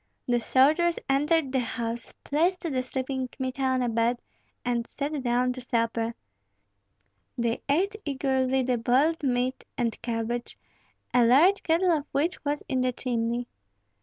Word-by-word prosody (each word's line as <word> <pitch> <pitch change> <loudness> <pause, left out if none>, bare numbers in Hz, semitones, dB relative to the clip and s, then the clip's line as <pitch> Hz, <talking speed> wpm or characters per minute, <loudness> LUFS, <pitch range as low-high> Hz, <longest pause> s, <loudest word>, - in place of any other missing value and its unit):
The 245 -1 +2
soldiers 305 +8 +3
entered 290 +1 +2
the 265 - +1
house, 235 -1 -4
placed 345 +5 +1
the 290 -8 -1
sleeping 260 0 -3
Kmita 260 +1 -5
on 260 -1 +2
a - - 0
bed, 230 +1 +1 0.5
and 240 -1 0
sat 290 0 -3
down 250 0 +1
to 255 - -8
supper. 230 -1 -1 1.2
They 235 -1 0
ate 380 +9 +2
eagerly 265 -2 +1
the 250 -1 0
boiled 270 +8 +2
meat 255 -1 0
and 235 -3 -1
cabbage, 235 +1 -3 0.6
a 245 -1 +5
large 305 +12 +5
kettle 345 +3 +2
of 300 -3 0
which 320 +6 0
was 290 0 -1
in 260 -2 0
the 255 0 +1
chimney. 240 -1 -1
255 Hz, 145 wpm, -27 LUFS, 240-290 Hz, 1.2 s, a